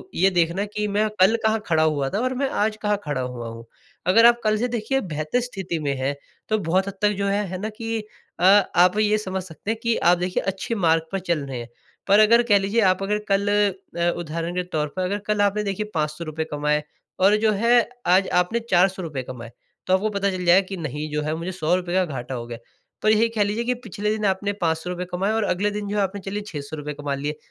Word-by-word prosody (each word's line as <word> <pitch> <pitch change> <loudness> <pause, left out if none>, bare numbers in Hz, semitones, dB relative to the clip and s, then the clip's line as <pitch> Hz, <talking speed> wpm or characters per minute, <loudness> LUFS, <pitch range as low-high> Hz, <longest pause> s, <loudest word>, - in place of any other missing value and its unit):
ये 190 +2 +4
देखना 170 +3 +2
है 205 - -2
कि 210 0 -3
मैं 210 +2 +1
कल 190 +5 +6
कहाँ 220 0 +2
खड़ा 160 -2 +3
हुआ 145 -3 +1
था 200 - -2
और 255 +2 0
मैं 275 +2 0
आज 215 0 +1
कहाँ 210 -1 +1
खड़ा 145 -4 -2
हुआ 125 -2 -5
हूँ। 115 0 -9 0.4
अगर 225 +5 +6
आप 235 0 +6
कल 215 0 +2
से 240 +3 0
देखिए 240 +2 -1
बेहतर 155 +4 -2
स्थिति 195 -9 -4
में 145 -2 -1
हैं 135 +2 -1 0.3
तो 215 - +2
बहुत 185 +2 +1
हद 200 - -4
तक 210 - +4
जो 200 0 0
है, 205 +1 0
है 185 +1 -5
ना 215 - -2
कि 225 -1 -2 0.4
अ, 175 - -2
आप 190 -1 +5
ये 215 0 +3
समझ 190 -3 -3
सकते 185 +5 -5
हैं 225 - -3
कि 230 -1 +2
आप 175 +1 +4
देखिए 180 +1 -1
अच्छे 195 +4 -3
मार्ग 165 -5 +2
पर 195 - -1
चल 175 -3 -1
रहे 130 -3 -5
है। 120 - -8 0.4
पर 200 +2 +6
अगर 230 +2 +6
कह 205 -4 +4
लीजिए 200 +4 +1
आप 185 -1 +3
अगर 210 +2 0
कल 195 +1 +2 0.5
अ, 170 0 +2
उदाहरण 170 +1 -4
के 180 - 0
तौर 150 0 0
पर 185 - -1
अगर 200 +3 -1
कल 210 -1 +1
आपने 205 +1 +2
देखिए 210 +1 -3
₹500 155 0 -2
कमाए 150 0 0 0.4
और 200 +2 +6
जो 220 0 +2
है 240 0 +5 0.3
आज 190 0 +3 0.2
आपने 230 +6 -2
₹400 175 -6 +1
कमाए 120 -2 -9 0.4
तो 185 - +2
आपको 205 +3 +2
पता 200 -1 0
चल 185 -1 -4
जाएगा 185 +2 +5
कि 195 -1 -5
नहीं 150 -1 -4
जो 150 0 -1
है 155 +1 -2
मुझे 170 +3 -4
₹100 180 0 -1
का 185 -1 +3
घाटा 130 -4 -5
हो 120 -1 -5
गया। 120 -1 -6 0.4
पर 215 - +3
यही 220 +2 +4
कह 220 -2 +1
लीजिए 210 +3 -1
कि 250 +1 +1
पिछले 210 0 -3
दिन 215 -1 -1
आपने 200 +1 0
₹500 175 +2 -1
रुपये 180 0 -5
कमाए 195 +3 0
और 225 - +1
अगले 205 +3 0
दिन 205 0 -4
जो 210 - -2
है 205 - +3
आपने 195 +1 -3
चलिए 200 +2 -3
₹600 150 -2 -6
कमा 145 -1 -3
लिए 150 +2 -4
190 Hz, 240 wpm, -23 LUFS, 160-210 Hz, 0.5 s, कल